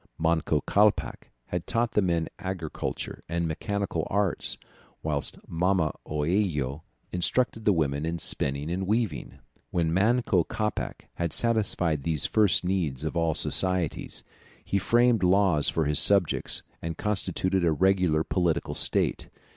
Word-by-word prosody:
Manco 80 Hz, -2 st, +1 dB
Capac 105 Hz, +6 st, +1 dB, 0.2 s
had 90 Hz, -1 st, -4 dB
taught 115 Hz, 0 st, 0 dB
the 105 Hz, -, +2 dB
men 85 Hz, -3 st, 0 dB
agriculture 95 Hz, -5 st, -5 dB
and 85 Hz, 0 st, -1 dB
mechanical 100 Hz, +5 st, -3 dB
arts, 100 Hz, -2 st, +1 dB, 0.5 s
whilst 75 Hz, -3 st, -1 dB
Mama 90 Hz, -1 st, +1 dB
Oello 75 Hz, -3 st, -1 dB, 0.3 s
instructed 110 Hz, +5 st, 0 dB
the 105 Hz, -, +5 dB
women 75 Hz, -5 st, 0 dB
in 85 Hz, +1 st, -2 dB
spinning 70 Hz, -1 st, +1 dB
and 95 Hz, +1 st, -2 dB
weaving. 110 Hz, -6 st, -2 dB, 0.3 s
When 80 Hz, -2 st, 0 dB
Manco 105 Hz, -1 st, +2 dB
Capac 105 Hz, +4 st, -4 dB
had 85 Hz, -3 st, -2 dB
satisfied 100 Hz, -10 st, +1 dB
these 80 Hz, -1 st, -1 dB
first 105 Hz, -7 st, +3 dB
needs 80 Hz, -8 st, -1 dB
of 80 Hz, -, -3 dB
all 85 Hz, -2 st, +1 dB
societies, 90 Hz, -4 st, -1 dB, 0.4 s
he 100 Hz, -, 0 dB
framed 120 Hz, +2 st, +3 dB
laws 90 Hz, -4 st, +4 dB
for 80 Hz, -, 0 dB
his 75 Hz, 0 st, +2 dB
subjects, 100 Hz, -5 st, +3 dB, 0.2 s
and 80 Hz, -1 st, -5 dB
constituted 95 Hz, -2 st, -1 dB
a 85 Hz, -, +3 dB
regular 90 Hz, -2 st, +2 dB
political 85 Hz, -3 st, -1 dB
state. -, -, +1 dB
90 Hz, 130 wpm, -27 LUFS, 80-100 Hz, 0.5 s, the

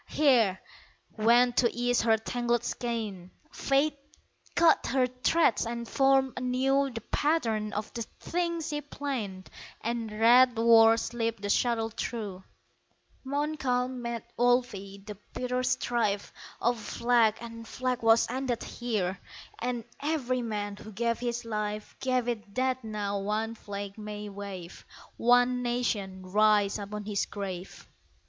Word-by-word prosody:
Here, 235 Hz, -11 st, +3 dB, 0.5 s
when 240 Hz, +3 st, +4 dB
to 235 Hz, -1 st, +3 dB
ease 245 Hz, 0 st, +1 dB
her 225 Hz, -1 st, +4 dB
tangled 240 Hz, +1 st, -1 dB
skein 215 Hz, -9 st, -4 dB, 0.2 s
Fate 280 Hz, +1 st, +1 dB, 0.6 s
cut 335 Hz, -2 st, +4 dB
her 260 Hz, 0 st, +2 dB
threads 255 Hz, +2 st, +2 dB
and 235 Hz, 0 st, -4 dB
formed 270 Hz, 0 st, +3 dB
anew 265 Hz, +2 st, +1 dB
The 235 Hz, -3 st, -6 dB
pattern 225 Hz, -9 st, +1 dB
of 210 Hz, +1 st, -4 dB
the 235 Hz, -, -4 dB, 0.2 s
thing 340 Hz, -1 st, -1 dB
she 300 Hz, -2 st, -3 dB
planned 250 Hz, -10 st, -5 dB, 0.3 s
And 230 Hz, -1 st, -3 dB
red 235 Hz, +3 st, +5 dB
war 225 Hz, 0 st, +7 dB
slipped 230 Hz, -2 st, -2 dB
the 205 Hz, -, 0 dB
shuttle 225 Hz, -1 st, +1 dB
through, 205 Hz, -6 st, -4 dB, 0.8 s
Montcalm 265 Hz, -3 st, -1 dB
met 235 Hz, -1 st, -4 dB
Wolfe! 245 Hz, +1 st, +3 dB
The 200 Hz, +1 st, -9 dB, 0.2 s
bitter 250 Hz, 0 st, -1 dB
strife 240 Hz, -5 st, 0 dB, 0.3 s
Of 240 Hz, 0 st, +1 dB
flag 235 Hz, -1 st, +2 dB
and 230 Hz, -1 st, -9 dB
flag 255 Hz, 0 st, -2 dB
was 225 Hz, 0 st, +5 dB
ended 255 Hz, -1 st, -2 dB
here 200 Hz, -6 st, -2 dB, 0.4 s
And 240 Hz, -1 st, -2 dB, 0.2 s
every 270 Hz, -4 st, -1 dB
man 205 Hz, -3 st, -3 dB
who 215 Hz, -, -10 dB
gave 230 Hz, +3 st, -1 dB
his 240 Hz, -1 st, -3 dB
life 210 Hz, -1 st, -4 dB
Gave 255 Hz, -2 st, 0 dB
it 215 Hz, -4 st, -4 dB
that 255 Hz, 0 st, 0 dB
now 205 Hz, -2 st, -2 dB
one 215 Hz, +3 st, -1 dB
flag 200 Hz, -1 st, -7 dB
may 210 Hz, 0 st, -6 dB
wave, 195 Hz, -3 st, -8 dB, 0.3 s
One 245 Hz, +1 st, +4 dB
nation 220 Hz, -6 st, -2 dB
rise 210 Hz, +1 st, +3 dB
upon 205 Hz, +1 st, -6 dB
his 205 Hz, -2 st, -1 dB
grave! 190 Hz, -3 st, -6 dB
235 Hz, 130 wpm, -29 LUFS, 210-250 Hz, 0.8 s, war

